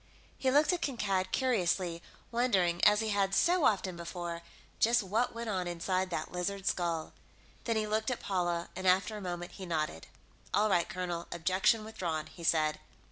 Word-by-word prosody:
He 265 - 0
looked 295 +6 +4
at 350 - -2
Kankad 195 -9 -1
curiously, 185 -8 +1 0.3
wondering, 190 -8 +2
as 210 +1 +6
he 220 - -1
had 195 -1 +1
so 350 -3 +3
often 190 -3 +2
before, 170 0 -5 0.4
just 235 0 +4
what 220 +6 0
went 230 0 -4
on 185 -4 -1
inside 185 +2 -1
that 160 -3 -3
lizard 190 +2 -3
skull. 170 -3 -1 0.5
Then 230 - 0
he 215 -1 +1
looked 215 +2 0
at 250 - -2
Paula, 175 -3 -1
and, 185 +1 -3
after 190 +4 +3
a 210 - -6
moment, 175 -1 -5
he 190 - -8
nodded. 155 - -2 0.5
"All 215 +1 +3
right, 175 -2 +2
colonel, 175 -2 -4
objection 185 +6 +2
withdrawn," 170 -8 -3
he 170 - -12
said. 155 -2 +2
185 Hz, 175 wpm, -32 LUFS, 175-220 Hz, 0.5 s, as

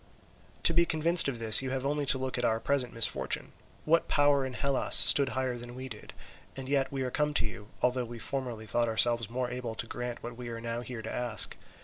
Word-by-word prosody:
"To 170 - +5
be 170 +1 +4
convinced 165 +1 +5
of 135 -4 -3
this 110 -1 +8
you 135 - -4
have 130 0 -3
only 145 0 -2
to 130 - +4
look 130 0 -4
at - - -3
our 110 -1 0
present 130 -1 -2
misfortune. 115 -1 -1 0.3
What 165 +2 +2
power 145 -1 +2
in 130 - -9
Hellas 135 +4 0
stood 140 -2 +6
higher 130 -2 -2
than 120 0 -10
we 130 +1 -7
did? 110 -3 -10 0.5
and 135 -1 -7
yet 135 -1 0
we 135 -1 -3
are 125 - -4
come 150 +1 -1
to - - +3
you, 105 -1 -8 0.2
although 125 0 0
we 120 0 -9
formerly 120 -2 -5
thought 120 +3 -1
ourselves 115 0 +2
more 125 +1 -4
able 125 -2 -6
to 115 - -3
grant 120 +1 -7
what 120 0 -7
we 120 0 -8
are 115 -1 -6
now 115 +1 -5
here 120 -2 -8
to 110 - -6
ask. 120 -4 -1
125 Hz, 235 wpm, -29 LUFS, 115-135 Hz, 0.5 s, this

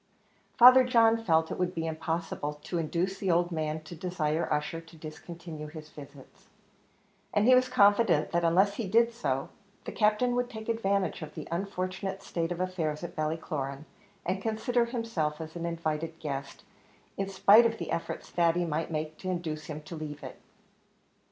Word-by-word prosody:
Father 255 +2 +9
John 230 -2 +4
felt 160 -4 +2
it - - -4
would 180 0 -1
be 165 -1 -2
impossible 160 -2 -3
to 175 - -2
induce 175 +4 -1
the 195 - -1
old 175 +1 +2
man 155 -1 -2
to 155 - -10
desire 165 -2 -2
Ussher 150 +2 -1
to 165 0 -16
discontinue 160 0 -8
his 155 0 -10
visits, 140 -2 -14 0.9
and 205 - +4
he 255 - +8
was 255 0 +4
confident 205 -6 +4
that 170 +1 +1
unless 190 +5 +3
he 230 - -2
did 230 +4 +3
so, 135 - -2 0.4
the - - -4
Captain 215 +3 +2
would 245 0 0
take 220 -1 -8
advantage 200 -5 0
of 155 -1 -8
the 155 - -7
unfortunate 190 +1 -3
state 165 0 -2
of 175 - -3
affairs 175 -4 -2
at 175 - -6
Ballycloran, 155 -2 -3 0.4
and 190 +2 -1
consider 235 +3 +1
himself 225 -11 -2
as 160 0 -7
an 170 0 -3
invited 165 -1 -3
guest, 140 -2 -5 0.5
in 195 0 -2
spite 205 +4 +6
of 225 0 -4
the - - -5
efforts 165 - -3
Thady 175 0 +2
might 160 0 -2
make 155 -1 -4
to 185 - -4
induce 160 -4 -3
him 150 -1 -7
to 165 - -8
leave 150 -2 -7
it. - - -9
170 Hz, 175 wpm, -29 LUFS, 155-200 Hz, 0.9 s, Father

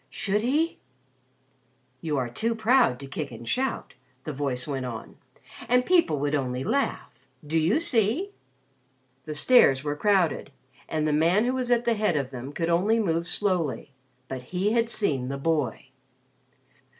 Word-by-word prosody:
Should 210 +1 -1
he? 295 +8 0 1.2
"You 155 -3 -2
are 130 -2 -1
too 225 - -2
proud 225 - +3
to - - -7
kick 140 +2 -5
and 115 0 -10
shout," 265 0 -2 0.3
the 155 - -5
voice 135 -2 -3
went 135 -3 -3
on. 115 -2 -8 0.5
"And 250 +1 +3
people 340 - +3
would 145 0 -1
only 130 -3 -1
laugh. 275 - -1 0.3
Do 160 +2 +1
you 175 - +2
see?" 295 - +1 0.9
The 155 - -5
stairs 145 - +5
were 145 -1 -2
crowded 185 -5 +1 0.4
and 155 -1 -1
the 150 - +1
man 170 +8 +3
who 250 - 0
was 255 -1 -2
at 240 -1 +2
the 235 - +3
head 210 -7 +1
of 135 -3 -3
them 130 +2 -7
could 165 +3 -2
only 200 +7 +2
move 170 -5 0
slowly. 170 - -1 0.4
But 130 -1 -5
he 180 +10 -1
had 230 0 +1
seen 140 - +2
the 140 +1 -4
boy. 150 -4 -1
165 Hz, 160 wpm, -26 LUFS, 140-230 Hz, 1.2 s, stairs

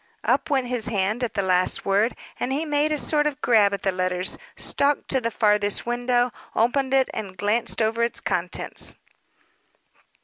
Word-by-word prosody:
Up 320 - +1
went 270 -3 +1
his 245 -3 -2
hand 215 +3 -1
at 240 - -3
the 200 - 0
last 185 -1 +1
word, 205 +4 +2 0.2
and 255 - -2
he 295 +4 -1
made 295 0 +1
a 305 - +1
sort 295 0 +2
of 295 -1 -4
grab 215 -7 +4
at 200 -1 -4
the 195 - +1
letters, 185 0 0 0.2
stalked 285 +1 0
to 265 - +1
the 230 - -1
farthest 210 -2 +1
window, 245 +1 +1 0.2
opened 260 +4 +1
it, 270 -1 +3
and 195 -3 -6
glanced 215 +3 +1
over 225 +2 0
its 235 0 0
contents. - - -2
235 Hz, 175 wpm, -24 LUFS, 205-265 Hz, 0.2 s, grab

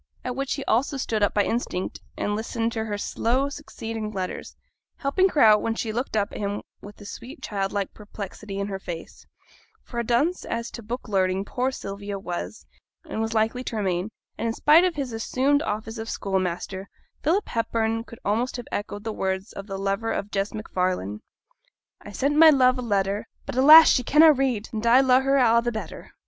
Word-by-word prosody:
At 250 -1 -3
which 275 0 -2
he 275 - -5
also 265 +5 +1
stood 225 -4 -1
up 205 - +2
by 205 - +4
instinct, 200 -6 -2 0.2
and 205 - -1
listened 225 +1 -2
to 220 -1 -3
her 205 -2 -3
slow 255 +6 0
succeeding 225 -7 -6
letters; 190 -3 -5 0.4
helping 370 +7 +2
her 300 - +1
out, 215 -1 +7
when 225 - -1
she 225 -1 -3
looked 240 -1 -2
up 200 -1 0
at - - -7
him 205 0 -3 0.2
with 205 0 -12
a - - -10
sweet 250 +9 -9
childlike 200 -1 -2
perplexity 205 -1 -8
in 200 - -1
her 195 -1 -4
face: 170 -3 -8 0.6
for 235 - -6
a - - 0
dunce 265 +10 +1
as 230 0 -4
to 235 - -8
book 235 +4 -6
learning 190 -1 +1
poor 255 +5 -1
Sylvia 200 -5 -6
was 110 - -6 0.4
and 220 - -3
was 225 0 -2
likely 225 +3 +1
to - - -4
remain; 190 -2 -1 0.3
and, 230 - -1
in 225 - 0
spite 315 +4 +6
of 365 -2 +1
his 270 -5 -3
assumed 265 +6 +1
office 225 -4 -4
of 225 +1 -5
schoolmaster, 190 0 -3 0.3
Philip 365 +7 +1
Hepburn 225 -1 -1
could 230 - -12
almost 235 +5 0
have 245 - -7
echoed 205 0 -4
the 225 - -3
words 190 +1 -3
of 195 - -8
the 195 -2 -5
lover 195 +3 -1
of 205 - -3
Jess 195 +1 -1
MacFarlane 180 - -2 0.8
I - - -10
sent 280 +2 0
my 320 0 +9
love 255 -3 +4
a - - -2
letter, 200 -2 -1 0.2
But, - - -6
alas! 305 +5 +10
she 255 - +3
canna 305 +5 +6
read, 255 -6 -1
And 215 0 -3
I 245 +3 +7
lo'e 260 -1 +4
her 270 +1 +2
a' 235 -3 +5
the 240 0 -1
better. 220 -2 -7
225 Hz, 200 wpm, -25 LUFS, 200-255 Hz, 0.8 s, alas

